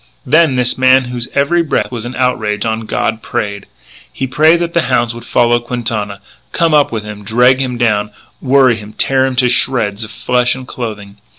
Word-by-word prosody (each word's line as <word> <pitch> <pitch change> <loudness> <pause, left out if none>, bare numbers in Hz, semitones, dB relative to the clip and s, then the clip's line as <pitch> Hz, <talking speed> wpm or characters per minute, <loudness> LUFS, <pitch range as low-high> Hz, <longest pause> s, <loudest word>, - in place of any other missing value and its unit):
Then 155 +1 +3
this 125 0 0
man 130 0 +5
whose 120 0 -4
every 140 +5 +2
breath 160 - -1
was 120 -2 -5
an 125 +1 -6
outrage 110 -4 -1
on 110 0 -3
God, 110 +1 -2
prayed. 100 -1 -4 0.4
He 135 - -3
prayed 155 +6 +3
that 170 0 -2
the 170 - +2
hounds 120 -2 +1
would 120 0 -10
follow 120 -1 +2
Quintana, 115 -4 -4 0.3
come 165 -3 +1
up 145 -1 +3
with 110 -2 -3
him, 105 -1 -9
drag 125 +5 +3
him 125 -2 -2
down, 105 -3 +1 0.3
worry 130 -3 +3
him, 105 0 -11
tear 135 -1 +1
him 130 - -3
to 125 0 +2
shreds 115 -4 +1
of 110 - -8
flesh 125 +2 0
and 130 -1 -9
clothing. 105 -5 -7
120 Hz, 195 wpm, -14 LUFS, 110-130 Hz, 0.4 s, man